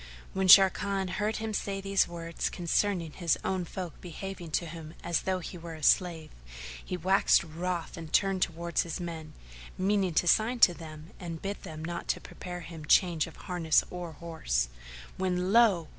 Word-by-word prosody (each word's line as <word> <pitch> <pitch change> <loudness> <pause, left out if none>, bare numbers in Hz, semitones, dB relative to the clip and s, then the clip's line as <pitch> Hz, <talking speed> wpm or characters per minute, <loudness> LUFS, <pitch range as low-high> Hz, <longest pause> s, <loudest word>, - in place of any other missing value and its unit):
When 190 0 0
Sharrkan 195 0 +6
heard 210 +3 -1
him 220 0 -3
say 195 -1 -2
these 195 0 +2
words 170 -1 -4
concerning 175 -1 0
his 170 0 0
own 185 -2 -1
folk 175 -1 -7
behaving 180 0 -7
to 170 - +1
him 160 -1 -9 0.3
though 190 -1 +1
he 180 0 -7
were 165 -1 -8
a 155 - -11
slave, 165 -2 +2 0.5
he 180 - -4
waxt 190 +2 +4
wroth 170 +1 -4
and 165 -2 -8
turned 195 -2 +2
towards 170 0 0
his 170 0 -4
men, 165 -3 -6 0.4
meaning 190 -2 +1
to - - +3
sign 220 +7 +3
to 175 - +8
them; 155 0 -10
and 170 -3 -6
bid 200 +1 -4
them 155 0 -7
not 170 0 -2
prepare 180 -1 -7
him 165 -1 -9
change 170 -1 +3
of - - -12
harness 170 -3 +2
or 175 -2 -6
horse, 100 - -2 0.5
when 185 +1 0
lo! 205 -9 +5
175 Hz, 170 wpm, -29 LUFS, 165-190 Hz, 0.5 s, to